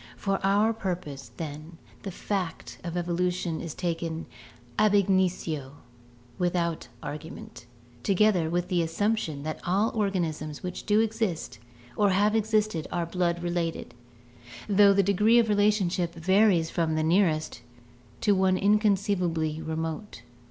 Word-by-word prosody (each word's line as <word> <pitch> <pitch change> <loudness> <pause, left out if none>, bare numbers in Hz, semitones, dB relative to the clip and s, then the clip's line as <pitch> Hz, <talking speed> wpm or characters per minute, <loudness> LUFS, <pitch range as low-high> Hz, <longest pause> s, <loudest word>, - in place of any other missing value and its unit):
For 195 -1 -1
our 205 +3 +3
purpose, 175 - -5
then, 155 +1 -7 0.2
the 195 - -5
fact 185 -2 -4
of 175 0 -4
evolution 175 -1 -1
is 165 -3 -6
taken 165 -2 -3 0.5
ab 210 -1 +4
initio, 180 -8 +1 0.7
without 175 -2 -1 0.2
argument, 145 -5 -8 0.3
together 190 - +2
with 175 +1 -1
the 180 -2 +2
assumption 165 -3 -1
that 155 0 -4
all 200 +5 +1
organisms 170 -8 -2
which 180 0 -6
do 210 0 +4
exist 220 -6 -2 0.4
or 205 -1 +3
have 205 +3 +2
existed 215 -6 +1
are 175 -1 -1
blood 175 0 -1
related, 175 -1 -2 0.7
though 205 -1 +6
the 200 0 +4
degree 210 +4 +4
of 230 -2 +4
relationship 195 -5 +1
varies 185 -1 +3
from 160 -2 0
the 155 - +1
nearest 160 - +1 0.6
to 210 - +4
one 190 -1 +3
inconceivably 190 -6 +1
remote. 160 - -5
180 Hz, 125 wpm, -27 LUFS, 165-205 Hz, 0.7 s, though